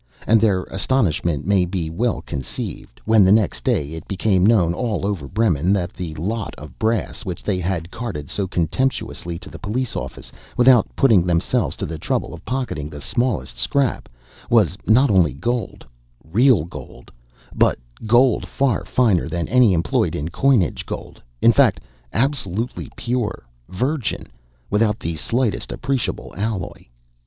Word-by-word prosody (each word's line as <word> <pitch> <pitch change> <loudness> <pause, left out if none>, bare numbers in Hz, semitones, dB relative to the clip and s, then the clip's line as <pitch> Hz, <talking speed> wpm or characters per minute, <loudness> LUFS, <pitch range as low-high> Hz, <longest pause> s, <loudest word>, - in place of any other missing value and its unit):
And 110 -1 +4
their 100 -5 +2
astonishment 90 - 0
may 100 -1 +3
be 90 -2 -2
well 115 +7 -1
conceived, 70 -2 -6
when 110 -2 +5
the 95 - +5
next 105 -2 +2
day 75 0 0
it 80 - -8
became 95 -1 +1
known, 95 -6 +4
all 105 0 -2
over 100 -9 -2
Bremen, 95 -3 +1
that 90 -3 -1
the 85 -4 -6
"lot 105 +7 -3
of 75 -3 -12
brass" 110 -3 -1
which - - -6
they 95 -3 -1
had 90 -1 -3
carted 100 -12 -5
so 100 +4 -2
contemptuously 85 -2 -2
to 90 - -11
the - - -10
police 120 +4 -2
office, - - -6 0.3
without 125 -2 +6
putting 110 -10 +5
themselves 85 -1 0
to - - -3
the 80 -1 -6
trouble - - -2
of 85 - -10
pocketing 125 - -3
the 75 - -9
smallest 110 - -1
scrap, 135 - 0 0.4
was 105 -6 +4
not 130 +4 +5
only 90 -9 +3
gold—real 80 - 0
gold—but - - -4 0.3
gold 120 +1 +4
far 130 -7 0
finer 110 -10 +2
than 85 +1 -2
any 125 -4 +5
employed 80 -5 +1
in 75 +3 -3
coinage—gold, 120 - 0 0.2
in - - +7
fact, - - +4 0.3
absolutely 120 -4 -2
pure, 120 -3 -2 0.3
virgin, 130 - -2 0.5
without 105 0 +2
the 85 0 -3
slightest 120 - -1
appreciable 130 -1 -3
alloy. 100 -2 -4
100 Hz, 145 wpm, -21 LUFS, 85-120 Hz, 0.5 s, in